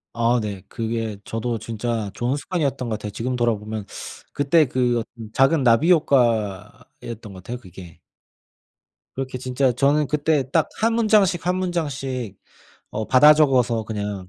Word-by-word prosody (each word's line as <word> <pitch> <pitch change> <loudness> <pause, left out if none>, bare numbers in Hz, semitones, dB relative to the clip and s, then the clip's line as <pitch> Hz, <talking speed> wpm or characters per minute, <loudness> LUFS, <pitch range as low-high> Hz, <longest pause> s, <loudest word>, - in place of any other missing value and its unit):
아 120 +1 +2
네. 105 -3 -5
그게 115 -2 -3
저도 115 +1 -3
진짜 115 -2 -3
좋은 125 +4 -1
습관이었던 145 -6 -2
것 115 - -2
같아요. 105 - -5
지금 125 +5 -3
돌아 120 -2 +2
보면 105 0 -6 0.5
그때 150 +3 +3
그 125 -2 +1
어떤 115 -1 -9
작은 135 +2 +3
나비 125 +8 +4
효과였던 115 - 0
것 95 -1 -12
같아요 120 +5 -5
그게. 90 -6 -13 1.2
그렇게 130 -1 -4
진짜 130 +1 0
저는 140 +4 +2
그때 150 -2 0
딱 160 -1 +2
1 225 +1 +3
문장씩, 210 -7 +3
1 180 - +1
문장씩 135 - -3 0.5
어 110 0 -4
받아 150 +4 +7
적어서 125 -6 +2
그냥 105 -3 -5
125 Hz, 285 characters per minute, -22 LUFS, 110-145 Hz, 1.2 s, 받아